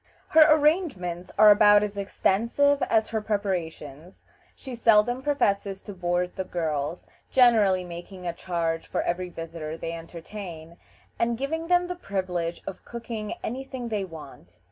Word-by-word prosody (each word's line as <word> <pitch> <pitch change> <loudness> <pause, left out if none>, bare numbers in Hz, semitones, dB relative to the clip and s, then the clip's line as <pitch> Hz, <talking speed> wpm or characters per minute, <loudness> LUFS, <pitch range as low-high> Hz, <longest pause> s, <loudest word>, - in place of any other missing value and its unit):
Her 320 - +6
arrangements 295 - +1
are 215 -1 +9
about 205 0 +6
as 205 -1 -3
extensive 235 +8 +1
as 220 -1 +2
her 220 -1 -2
preparations. 180 -6 -4 0.3
She 265 - -9
seldom 230 +1 +3
professes 200 -9 0
to 205 - -8
board 180 0 -1
the 190 - -2
girls, 160 -2 -3 0.2
generally 215 -7 +4
making 180 +1 -9
a 170 - -2
charge 165 -2 -2
for - - -1
every 180 +1 -2
visitor 165 -2 -6
they 165 - -5
entertain, 170 0 -9 0.4
and 235 0 +1
giving 320 +6 -3
them 355 0 +3
the 360 - -3
privilege 185 - -3
of 190 - -7
cooking 230 -3 -6
any 255 +4 -3
thing 260 -3 -6
they 210 -3 -1
want. 145 - -11
195 Hz, 145 wpm, -26 LUFS, 170-235 Hz, 0.4 s, are